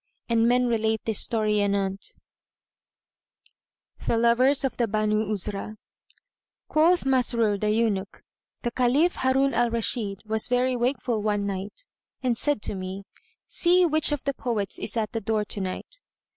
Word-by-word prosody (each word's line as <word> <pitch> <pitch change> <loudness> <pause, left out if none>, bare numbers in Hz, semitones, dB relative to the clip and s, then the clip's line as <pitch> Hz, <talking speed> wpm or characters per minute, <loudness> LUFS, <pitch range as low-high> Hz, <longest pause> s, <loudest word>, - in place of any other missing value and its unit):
And 230 -1 +2
men 250 +1 +3
relate 220 -2 0
this 220 -2 0
story 215 -2 +1
anent 200 -1 -2 1.9
THE 230 - 0
LOVERS 250 +5 +3
OF 270 - -2
THE 235 - +1
BANU 215 0 0
UZRAH.[FN#125] 210 +1 -3 0.9
Quoth 335 +2 +3
Masrur 235 -5 +1
the 210 - 0
Eunuch:—The 215 +2 -3
Caliph 260 +8 +2
Harun 265 +1 +2
Al 240 +1 +2
Rashid 225 -3 0
was 220 0 -1
very 250 +1 +1
wakeful 245 -2 -1
one 205 -1 0
night 200 - -5 0.4
and 250 -2 +1
said 290 -2 -1
to - - -2
me, 190 +1 -6 0.4
"See 360 +1 +3
which 310 -2 +2
of 295 -3 -2
the 280 - -1
poets 220 -7 -3
is 230 - -5
at 215 -2 -1
the 225 - -3
door 215 0 -1
to 205 - -5
night." 190 - -6
225 Hz, 145 wpm, -25 LUFS, 210-255 Hz, 1.9 s, men